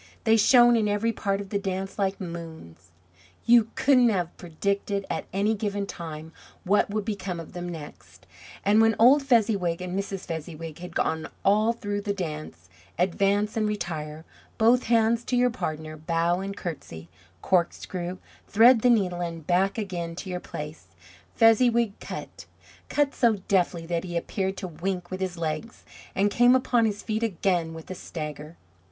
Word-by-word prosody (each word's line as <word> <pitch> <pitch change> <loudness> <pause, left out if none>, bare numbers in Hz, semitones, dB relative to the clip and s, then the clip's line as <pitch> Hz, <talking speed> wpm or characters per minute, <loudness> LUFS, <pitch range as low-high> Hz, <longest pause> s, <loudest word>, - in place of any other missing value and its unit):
They 225 0 +4
shone 240 +2 +6
in 220 -2 +2
every 205 +3 +1
part 200 -1 -1
of 200 - -9
the 200 - -1
dance 195 +1 -4
like 195 -1 0
moons. 165 - -9 0.6
You 230 -2 +5
couldn't 255 -3 +4
have 180 -5 -1
predicted 200 +4 -2
at - - -3
any 200 +3 +1
given 205 -1 -2
time 160 -3 -8 0.3
what 205 +3 +2
would 210 0 -2
become 195 -5 -4
of 165 - -10
them 175 0 -5
next. 145 - -10 0.4
And 210 +2 +5
when 225 -1 +4
old 260 +6 +6
Fezziwig 210 -10 +2
and 180 0 -5
Mrs. 195 -1 -3
Fezziwig 160 -1 -6
had 180 -1 -9
gone 160 0 -1 0.2
all 215 +3 +4
through 205 -3 -4
the 200 -1 -2
dance, 150 - -6 0.3
advance 200 +4 +1
and 215 -1 +1
retire; 160 -6 -4 0.3
both 235 +3 +4
hands 230 0 +3
to 250 - -1
your 250 0 +3
partner, 155 -6 -5
bow 170 +2 0
and 195 +1 -5
courtesy, 85 - -7 0.4
corkscrew, 180 0 -1 0.3
thread 230 +2 +6
the 250 - +4
needle, 185 -7 +2
and 165 -2 -5
back 190 +5 +2
again 175 -6 -4
to 185 +1 -6
your 180 - -3
place; 150 - -8 0.5
Fezziwig 230 -1 +4
"cut" - - -8 0.4
cut 290 -1 +1
so 235 -3 +3
deftly 175 -3 +1
that 170 0 -2
he 175 -2 -3
appeared 190 +2 -2
to 185 - -4
wink 180 +2 -4
with 185 - -4
his 185 -2 -3
legs, 160 +7 -4 0.3
and 200 +1 +2
came 245 +3 +5
upon 245 -2 +2
his 205 -2 -2
feet 220 0 -2
again 175 -6 0
with 160 +3 -9
a - - -2
stagger. 150 -2 -7
195 Hz, 165 wpm, -26 LUFS, 170-220 Hz, 0.6 s, shone